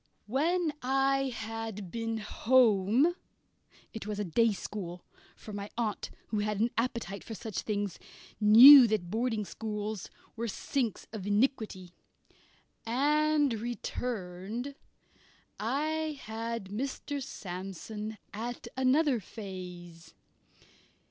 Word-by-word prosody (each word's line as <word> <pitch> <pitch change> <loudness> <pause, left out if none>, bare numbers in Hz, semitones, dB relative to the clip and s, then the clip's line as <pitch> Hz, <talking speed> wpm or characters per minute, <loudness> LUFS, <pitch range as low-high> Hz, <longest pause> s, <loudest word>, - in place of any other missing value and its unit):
When 310 - +1
I 270 +1 +2
had 220 -4 -5
been 225 -1 -2
home 230 - +3 0.8
it 220 -2 -6
was 210 -1 -3
a 210 - -1
day 225 +5 +3
school, 180 -3 -6 0.3
for 215 - -10
my 200 0 -5
aunt, 220 -4 -2 0.2
who 215 - 0
had 210 -1 -1
an 230 +2 +2
appetite 230 -5 -2
for 225 - -7
such 215 0 -5
things, 205 -3 -2 0.4
knew 240 +5 +11
that 200 -5 -1
boarding 225 -1 0
schools 210 +1 -4 0.3
were 235 +1 -3
sinks 230 0 -2
of 205 -3 -5
iniquity 205 -4 0 0.9
and 295 +3 +2
returned, 225 0 -4 0.9
I 305 +6 -1
had 225 -2 -4
Mr. 275 +5 -3
Sandsome 210 +2 -6 0.2
at 235 +3 -5
another 260 0 +3
phase. 180 -4 -9
225 Hz, 105 wpm, -30 LUFS, 205-255 Hz, 0.9 s, knew